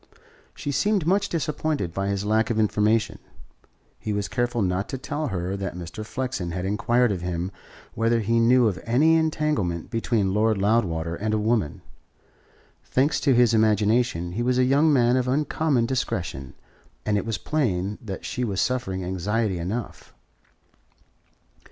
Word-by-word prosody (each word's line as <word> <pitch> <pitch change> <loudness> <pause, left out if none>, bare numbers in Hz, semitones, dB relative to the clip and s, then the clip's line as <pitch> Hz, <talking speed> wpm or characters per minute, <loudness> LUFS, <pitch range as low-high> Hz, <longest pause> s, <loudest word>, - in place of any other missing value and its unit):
She 145 - -4
seemed 205 +3 +1
much 200 +3 +2
disappointed 150 - -2
by 95 +1 -2
his 100 0 -1
lack 110 +1 +2
of 115 - -1
information. 110 +1 +1 0.8
He 105 - -3
was 100 -1 -1
careful 120 -2 -1
not 90 +2 -1
to 135 - -3
tell 145 +3 -3
her 95 -3 -3
that 95 -3 -4
Mr. 90 +4 -7
Flexen 125 -5 -3
had 90 +2 -3
inquired 120 +4 +2
of 95 -3 -3
him 90 +1 -3 0.4
whether 115 +1 +1
he 115 +2 +1
knew 120 +1 +5
of 95 -4 -2
any 140 +8 +3
entanglement 150 - 0
between 115 -4 0
Lord 110 +1 +2
Loudwater 95 -6 +1
and 110 +5 -1
a - - +1
woman. 105 -8 0 1.0
Thanks 140 +4 +1
to 135 -4 +3
his 120 -1 +4
imagination 110 -4 +2
he 105 +7 -3
was 125 +1 +1
a 130 - +4
young 140 +5 +4
man 125 -2 +4
of 130 -1 0
uncommon 145 -1 +1
discretion, 85 - -3 0.5
and 105 - +1
it 100 - 0
was 115 -2 -2
plain 105 -9 -1
that 95 -5 -7
she 125 - -3
was 100 -5 -2
suffering 95 -8 -1
anxiety 95 +2 -1
enough. 105 +8 -5
110 Hz, 155 wpm, -24 LUFS, 95-125 Hz, 1.0 s, knew